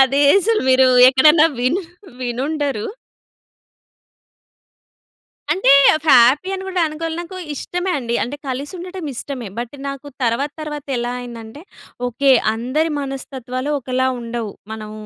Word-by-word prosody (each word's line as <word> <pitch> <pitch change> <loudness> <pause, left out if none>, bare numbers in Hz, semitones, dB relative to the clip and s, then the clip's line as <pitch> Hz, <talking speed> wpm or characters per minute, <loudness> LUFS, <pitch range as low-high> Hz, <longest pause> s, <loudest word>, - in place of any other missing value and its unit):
అదే 270 +1 +4 0.2
అసలు 440 +2 +1
మీరు 260 0 +5 0.2
ఎక్కడైనా 300 +4 +6
విను 290 +11 0 0.4
వినుండరు. 270 0 -2 2.7
అంటే, 350 -7 +1 0.4
హ్యాపీ 265 +8 +5
అని 380 0 -4
గూడా 365 -2 -1
అనుకోవాలి 320 +1 -5
నాకు 350 +2 -7 0.2
ఇష్టమే 355 +6 -3
అండి. 235 -2 -2
అంటే, 260 +5 -5
కలిసి 275 +6 -4
ఉండటం 360 -1 -7
ఇష్టమే. 250 -2 -6
బట్ 240 +3 -6
నాకు 275 +1 -6 0.2
తర్వాత 255 +5 0
తర్వాత 295 -2 -6
ఎలా 240 +1 -2
అయిందంటే 235 +2 -9 0.5
ఓకే. 270 +3 +2 0.2
అందరి 260 +8 -1
మనస్తత్వాలు 265 -1 -5
ఒకలా 255 +1 -1
ఉండవు. 230 -3 -5 0.2
మనం 215 -1 -7
270 Hz, 120 wpm, -19 LUFS, 245-310 Hz, 2.7 s, ఎక్కడైనా